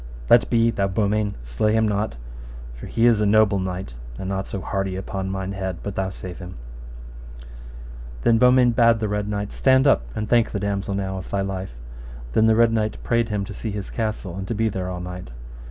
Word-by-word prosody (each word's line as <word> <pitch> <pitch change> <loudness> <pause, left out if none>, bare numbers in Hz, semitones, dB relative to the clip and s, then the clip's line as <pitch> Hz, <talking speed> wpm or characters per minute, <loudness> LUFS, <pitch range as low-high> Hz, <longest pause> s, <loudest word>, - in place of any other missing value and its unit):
Let 120 - +6
be, 115 -1 +3
thou 100 -3 0
Beaumains, 105 +1 0
slay - - 0
him 110 0 +3
not, 105 - -1 0.6
for - - -9
he 115 - +1
is 115 -3 +4
a - - +3
noble 105 -1 +4
knight, 95 -7 -4 0.2
and 95 - -5
not 95 0 -2
so 100 - -4
hardy, 95 0 -2
upon 95 0 -4
thine 95 0 -3
head, 95 -3 -4
but 100 - -4
thou 95 0 -1
save 90 -1 -8
him. 90 -1 -8 1.7
Then 115 -1 +4
Beaumains 125 -1 +5
bade 115 -1 +5
the 110 - -1
Red 105 0 -2
Knight, 105 0 -3
Stand 130 0 +3
up, 135 - +5
and 105 - -3
thank 120 -1 +3
the 100 - -1
damosel 100 -1 -2
now 95 -1 -3
of - - -9
thy 100 - -1
life. 95 -7 -4 0.6
Then 110 +7 +4
the 110 - +5
Red 115 0 +4
Knight 110 -1 0
prayed 115 -1 +1
him 105 -2 -1
to 100 - -8
see 110 - -5
his 100 -1 -5
castle, 105 -5 -3
and 95 0 -5
to 115 - -2
be 110 +1 +1
there 95 -2 -4
all 90 -1 -5
night. 90 -6 -7
100 Hz, 215 wpm, -23 LUFS, 95-110 Hz, 1.7 s, Let